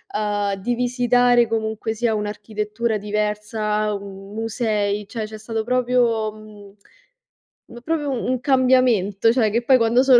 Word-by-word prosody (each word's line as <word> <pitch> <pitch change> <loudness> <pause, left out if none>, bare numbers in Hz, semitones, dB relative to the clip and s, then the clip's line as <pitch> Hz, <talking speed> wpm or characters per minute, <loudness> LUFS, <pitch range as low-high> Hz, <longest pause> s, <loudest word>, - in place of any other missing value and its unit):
uhm, 205 -1 0
di 225 +6 -2
visitare 245 -1 +3
comunque 220 0 -2
sia 225 0 0
un'architettura 210 +2 -3
diversa, 210 0 -1
u 195 0 -8
musei, 210 -2 -1
cioè 225 0 -5
c'è 215 0 -9
stato 220 0 -3
proprio, 240 -3 +1
mhmm, 210 -2 -14 1.0
m 240 - -8
proprio 310 -2 -1
un 255 0 -1
cambiamento, 250 -6 +3
cioè 230 -4 +2
che 235 - +1
poi 260 +1 +5
quando 235 +2 +3
sono 260 -3 +7
220 Hz, 135 wpm, -21 LUFS, 210-245 Hz, 1.0 s, sono